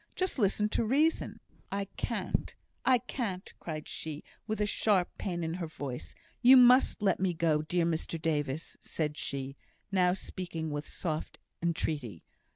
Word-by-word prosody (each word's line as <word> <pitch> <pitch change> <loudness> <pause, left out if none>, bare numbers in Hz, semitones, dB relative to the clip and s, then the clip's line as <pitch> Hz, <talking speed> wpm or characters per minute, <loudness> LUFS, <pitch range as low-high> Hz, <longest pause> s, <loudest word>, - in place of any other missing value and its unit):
Just 370 -6 -1
listen 210 0 +3
to 230 - +1
reason." 295 +8 +2 0.3
"I 200 0 -1
can't! - - -2 0.3
I 260 -1 +5
can't!" 225 -6 -4
cried 155 -2 -5
she, 155 -2 -5 0.2
with 215 -1 0
sharp 200 -4 +2
pain 175 -3 -2
in 160 0 -2
her 175 -1 -3
voice. 140 -5 -6 0.3
"You 260 +2 +9
must 250 -3 +6
let 190 -3 +3
me 185 -2 +1
go, 160 -2 +2
dear 170 +2 +1
Mr 165 0 -1
Davis!" 150 -1 -1
said 150 -2 -2
she, 135 -1 -4 0.3
now 180 -2 +4
speaking 170 -4 -4
with 145 0 -3
soft 155 -3 -3 0.2
entreaty. 150 - -2
175 Hz, 150 wpm, -31 LUFS, 155-210 Hz, 0.3 s, You